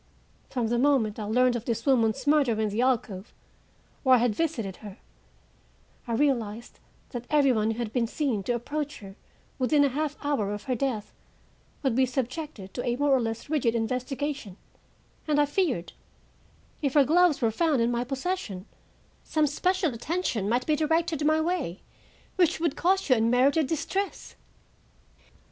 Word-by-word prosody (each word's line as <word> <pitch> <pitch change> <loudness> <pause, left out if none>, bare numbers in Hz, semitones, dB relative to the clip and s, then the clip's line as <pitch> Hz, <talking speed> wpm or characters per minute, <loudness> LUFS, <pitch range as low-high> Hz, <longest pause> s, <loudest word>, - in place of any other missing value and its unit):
From 240 -4 -1
the 240 0 +1
moment 250 -6 +2
I 210 - -3
learned 250 +3 +3
of 235 -1 -4
this 230 -1 -2
woman's 255 -1 +2
murder 285 -7 +3
in 215 -1 +1
the 210 +4 -1
alcove, 230 -6 -1 0.7
where 260 -2 +6
I - - +5
had 240 -2 +2
visited 225 - -2
her, 205 -2 -10 1.1
I 235 - -2
realized 235 -4 -1 0.3
that 245 -1 -6
every 290 -3 +4
one 220 -2 +1
who 225 - -2
had 230 -2 -4
been 240 -3 +1
seen 250 -5 -1
to 245 - 0
approach 290 +5 -4
her 195 -1 -11 0.4
within 285 +3 +3
a 280 - +3
half 295 +2 -2
hour 225 -9 0
of 205 - -9
her 260 - -1
death 245 -4 -2 0.7
would 265 -4 +1
be 260 0 +3
subjected 255 - -4
to 245 - -4
a 240 - 0
more 285 +2 +1
or 265 -2 +4
less 225 0 -4
rigid 270 -7 +1
investigation, 255 -1 -3 0.7
and 295 -1 +2
I 295 - +5
feared, 290 - -1 0.9
if 280 -2 -1
her 285 -2 +6
gloves 345 +1 +4
were 230 -3 +1
found 300 +3 +1
in 230 +1 +2
my 240 0 0
possession, 265 - -4 0.6
some 310 -1 +1
special 360 +1 0
attention 240 - -2
might 245 +2 +1
be 305 - +2
directed 320 0 0
my 310 +1 +3
way 315 - -2 0.6
which 345 -3 +3
would 325 -3 0
cause 380 +2 +1
you 255 - +5
unmerited 255 +7 +3
distress. 385 +6 -3
255 Hz, 165 wpm, -27 LUFS, 230-300 Hz, 1.1 s, where